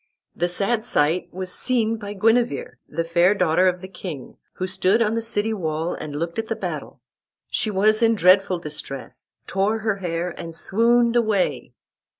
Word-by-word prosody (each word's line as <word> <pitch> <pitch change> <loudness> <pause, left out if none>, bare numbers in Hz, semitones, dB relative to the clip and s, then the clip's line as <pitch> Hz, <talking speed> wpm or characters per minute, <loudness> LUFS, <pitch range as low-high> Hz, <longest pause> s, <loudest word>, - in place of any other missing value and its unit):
The 175 - 0
sad 210 +5 0
sight 160 +1 +1
was 185 0 -5
seen 230 -3 0
by 205 -2 -6
Guenever, 230 +4 +1
the 165 +2 -2
fair 170 +4 +3
daughter 180 -1 +3
of 180 -1 0
the 185 - -7
king, 175 -7 -8 0.2
who 185 - -3
stood 190 +3 +2
on 220 -2 +2
the 230 - 0
city 220 -1 -1
wall 160 -3 -2
and 145 -2 -6
looked 170 +6 -3
at 220 - -3
the - - -2
battle. - - -6 0.5
She 240 -3 0
was 215 +3 +3
in 230 0 +4
dreadful 185 -1 +4
distress, 150 -4 -7
tore 200 +3 0
her 215 -2 -1
hair, 175 -1 -3
and 165 -1 -8
swooned 235 +6 +2
away. 195 - 0
190 Hz, 170 wpm, -23 LUFS, 170-220 Hz, 0.5 s, in